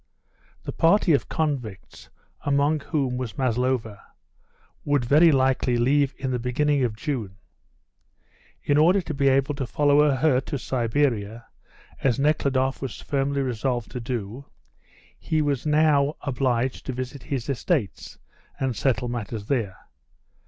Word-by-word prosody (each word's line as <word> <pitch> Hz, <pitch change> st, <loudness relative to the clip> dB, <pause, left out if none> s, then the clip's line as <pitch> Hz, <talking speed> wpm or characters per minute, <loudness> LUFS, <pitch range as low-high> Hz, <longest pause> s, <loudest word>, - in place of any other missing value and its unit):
The -, -, -5 dB
party 170 Hz, 0 st, +3 dB
of 140 Hz, -, 0 dB
convicts, 135 Hz, -, -4 dB, 0.3 s
among 145 Hz, +2 st, +2 dB
whom 140 Hz, -4 st, -2 dB
was 125 Hz, -4 st, -5 dB
Maslova, 125 Hz, -4 st, -1 dB, 0.8 s
would 145 Hz, -4 st, +1 dB
very 155 Hz, +6 st, +6 dB
likely 130 Hz, -2 st, +2 dB
leave 140 Hz, +3 st, +2 dB
in 130 Hz, -1 st, -3 dB
the 125 Hz, -, -1 dB
beginning 135 Hz, +3 st, +1 dB
of 115 Hz, -4 st, -1 dB
June. 110 Hz, -6 st, -4 dB, 1.3 s
In 145 Hz, +1 st, +2 dB
order 175 Hz, +6 st, +5 dB
to 170 Hz, -, -5 dB
be 140 Hz, -1 st, +1 dB
able 135 Hz, +2 st, +2 dB
to 135 Hz, -3 st, -4 dB
follow 145 Hz, +2 st, +3 dB
her 130 Hz, -1 st, +2 dB
to 140 Hz, -, -4 dB
Siberia, 115 Hz, -4 st, -1 dB, 0.6 s
as 130 Hz, -2 st, +2 dB
Nekhludoff 135 Hz, -2 st, +1 dB
was 135 Hz, -4 st, -5 dB
firmly 140 Hz, 0 st, -1 dB
resolved 125 Hz, -1 st, -2 dB
to 125 Hz, -, -5 dB
do, 120 Hz, +1 st, -5 dB, 0.7 s
he 160 Hz, -2 st, -1 dB
was 145 Hz, -2 st, -1 dB
now 150 Hz, -1 st, +3 dB
obliged 130 Hz, -2 st, -1 dB
to 130 Hz, -, -2 dB
visit 130 Hz, +2 st, -6 dB
his 130 Hz, -3 st, -4 dB
estates, 135 Hz, -, -2 dB, 0.4 s
and 130 Hz, -3 st, -1 dB
settle 125 Hz, -2 st, 0 dB
matters 115 Hz, -3 st, -5 dB
there. 105 Hz, -7 st, -2 dB
135 Hz, 135 wpm, -24 LUFS, 120-145 Hz, 1.3 s, very